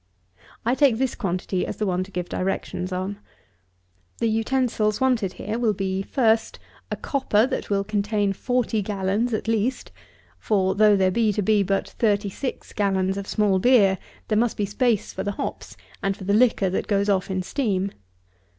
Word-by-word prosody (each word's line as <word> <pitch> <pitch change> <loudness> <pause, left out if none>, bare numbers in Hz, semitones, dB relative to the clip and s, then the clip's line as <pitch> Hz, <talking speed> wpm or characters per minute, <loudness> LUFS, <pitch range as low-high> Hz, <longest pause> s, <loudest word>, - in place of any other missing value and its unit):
I 240 - +3
take 265 -4 +4
this 260 0 0
quantity 185 -2 -2
as - - -4
the 215 - -1
one 185 -1 0
to - - -15
give 180 -2 -4
directions 185 0 -3
on. 190 +2 -3 1.0
The 230 - 0
utensils 225 -2 0
wanted 245 -8 +1
here 215 +3 -4
will 220 -4 +1
be, 190 0 -1
FIRST, 225 +1 +1 0.3
a - - -2
copper 250 -6 +1
that - - -3
will 200 -1 +1
contain 205 0 0
forty 245 0 0
gallons, 200 +4 -1
at 220 0 -2
least; 225 +3 -1 0.5
for, 190 -3 +1
though 210 +1 +5
there 190 -1 +3
be 220 +2 +2
to 205 - -1
be 210 +1 +3
but 195 0 0
thirty 205 -3 0
six 260 +6 -5
gallons 190 -2 +1
of 200 0 -5
small 205 -3 +2
beer, 200 -4 +4 0.3
there 215 -1 +2
must 235 -1 +1
be 205 - 0
space 225 +1 0
for 190 - -4
the 205 +1 -2
hops, - - -6 0.2
and 195 0 -1
for - - -9
the 200 +2 0
liquor 215 -4 +3
that - - -2
goes 200 -1 +1
off 195 -2 +1
in 185 -1 -1
steam. 200 -4 -1
205 Hz, 180 wpm, -24 LUFS, 195-225 Hz, 1.0 s, though